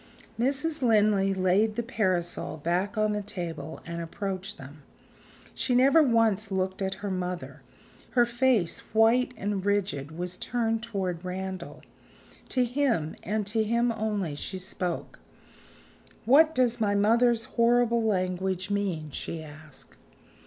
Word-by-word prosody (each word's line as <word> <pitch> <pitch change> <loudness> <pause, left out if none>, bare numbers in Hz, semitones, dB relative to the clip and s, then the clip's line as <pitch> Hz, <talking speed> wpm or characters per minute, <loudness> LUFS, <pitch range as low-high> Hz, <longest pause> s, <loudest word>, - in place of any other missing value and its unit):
Mrs. 285 +5 0
Linley 210 -4 +3
laid 195 +3 +2
the 235 - -1
parasol 180 -8 -1
back 175 +7 -1
on 215 0 +2
the 210 - -1
table, 170 -7 -6
and 170 0 -5
approached 195 +4 -5
them. 145 +3 -12 0.7
She 250 - 0
never 275 +6 +6
once 225 -6 +2
looked 190 0 -2
at 190 0 -1
her 200 - -2
mother; 180 -1 -4 0.6
her 240 - +7
face, 240 -7 +1 0.2
white 235 +3 +4
and 200 -2 -2
rigid, 185 -7 -1
was 180 +1 -3
turned 225 -2 -1
toward 190 -7 -3
Randal. 185 0 -6 0.7
To 255 -1 +2
him, 240 - 0
and 210 +2 -2
to 220 +2 +1
him 235 +2 +1
only, 210 -7 -2
she 190 +6 -5
spoke. 180 -1 -4 1.1
"What 310 +7 +5
does 245 -2 +2
my 205 -1 +2
mother's 230 +2 +3
horrible 235 0 +2
language 185 -1 -1
mean?" 180 -7 -2
she 160 +3 -5
asked. 155 -2 -13
205 Hz, 130 wpm, -27 LUFS, 180-230 Hz, 1.1 s, her